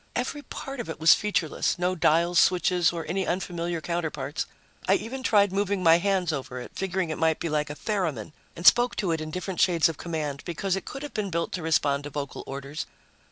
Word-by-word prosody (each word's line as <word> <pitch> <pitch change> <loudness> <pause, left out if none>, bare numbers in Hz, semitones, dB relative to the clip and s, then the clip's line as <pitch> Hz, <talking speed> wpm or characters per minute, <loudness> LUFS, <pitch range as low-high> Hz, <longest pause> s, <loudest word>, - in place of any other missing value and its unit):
Every 260 +4 -2
part 275 -2 -7
of 240 - -5
it - - -5
was 160 +1 +8
featureless 200 -7 0
no 180 +1 +1
dials, 170 0 +3
switches 180 -1 +3
or 170 -2 -5
any 190 0 -1
unfamiliar 175 -2 -2
counterparts. 155 -4 -3 0.4
I 195 - +5
even 245 +6 -4
tried 205 -6 +3
moving 200 -1 0
my 165 0 +6
hands 185 -3 +1
over 130 -3 -5
it, 125 - -8
figuring 190 -3 -2
it 155 - -4
might 160 -1 +2
be 170 - -2
like 150 -1 0
a 145 - -5
theramin, 165 - -2 0.2
and 170 - -8
spoke 240 +9 +6
to 190 -6 0
it 160 -1 -1
in 155 - -5
different 180 +2 -3
shades 170 -4 +4
of 160 - -6
command, 150 -4 -3
because 185 +2 -1
it 195 - -5
could 275 - -7
have 295 - -7
been 210 -2 -2
built 170 -1 -2
to 180 - -3
respond 145 -3 +1
to - - -5
vocal 140 -2 -5
orders. 140 +2 -5
170 Hz, 215 wpm, -26 LUFS, 155-195 Hz, 0.4 s, was